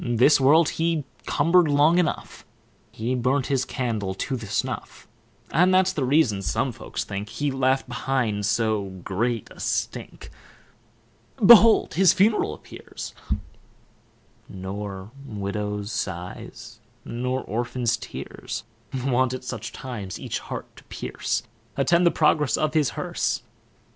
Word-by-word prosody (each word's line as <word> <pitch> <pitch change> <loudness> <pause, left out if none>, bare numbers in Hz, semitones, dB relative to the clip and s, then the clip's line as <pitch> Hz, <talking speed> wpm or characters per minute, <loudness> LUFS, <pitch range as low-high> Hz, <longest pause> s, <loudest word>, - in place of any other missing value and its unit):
This 125 +4 +4
world 150 +4 +6
he 165 -2 0 0.2
cumber'd 170 +3 +4
long 150 +4 +4
enough; 170 -4 -2 0.5
He 115 +3 -2
burnt 130 +2 +1
his 135 -2 0
candle 110 -7 -2
to 130 +7 -2
the 115 -4 -6
snuff; - - -3 0.4
And 180 +5 +4
that's 185 0 +4
the 145 - -1
reason, 130 -7 +3
some 130 +6 0
folks 120 - -5
think, 100 +1 -5
He 145 +5 -2
left 135 0 +1
behind 120 -5 -1
so 110 -2 +1 0.2
great 115 +3 -1
a - - -14
stink. - - -3 1.1
Behold 230 +1 +8
his 185 -1 +5
funeral 210 +3 +2
appears, - - -9 1.4
Nor 95 +1 -6
widow's 105 -2 -4
sighs, 110 +6 -6 0.3
nor 125 +2 -2
orphan's 120 +2 -1
tears, 105 - -7 0.4
Wont 130 -1 +2
at 130 - -8
such 120 -3 -5
times 110 -8 -6
each - - -3
heart - - -8
to - - -14
pierce, - - -3 0.3
Attend 170 +6 +4
the - - +7
progress 150 -3 +2
of 155 0 0
his 150 -5 +3
hearse. - - -1
125 Hz, 130 wpm, -25 LUFS, 110-150 Hz, 1.4 s, Behold